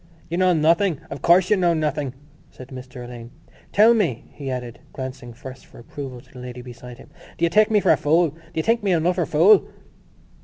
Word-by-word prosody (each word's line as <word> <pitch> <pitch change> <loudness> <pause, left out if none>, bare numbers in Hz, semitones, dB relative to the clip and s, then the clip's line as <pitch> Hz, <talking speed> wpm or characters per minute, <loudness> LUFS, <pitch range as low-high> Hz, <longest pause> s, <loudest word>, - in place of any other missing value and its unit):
"You—know—nothing. 170 -1 +2
Of 140 - -6
course 180 +3 +4
you 210 - +5
know 175 -2 +2
nothing," 150 -4 -2 0.3
said 130 0 -13
Mr 125 -1 -9
Alleyne. 120 -1 -10 0.4
"Tell 220 +3 +6
me," 170 - -1
he 140 -2 -7
added, 125 -2 -5
glancing 130 -2 -7
first 130 +2 -11
for - - -17
approval 125 +1 -8
to - - -24
the 125 - -11
lady 125 0 -8
beside 125 0 -11
him, - - -16 0.3
"do 170 - +2
you - - +1
take 215 +5 +4
me 215 -1 +3
for - - +3
a - - +4
fool? 160 +2 +2
Do 160 - -20 0.2
you 160 - 0
think 230 +1 +1
me 195 -3 +1
an 165 -1 0
utter 180 -2 +1
fool?" 185 +7 +5
150 Hz, 205 wpm, -22 LUFS, 125-180 Hz, 0.4 s, Tell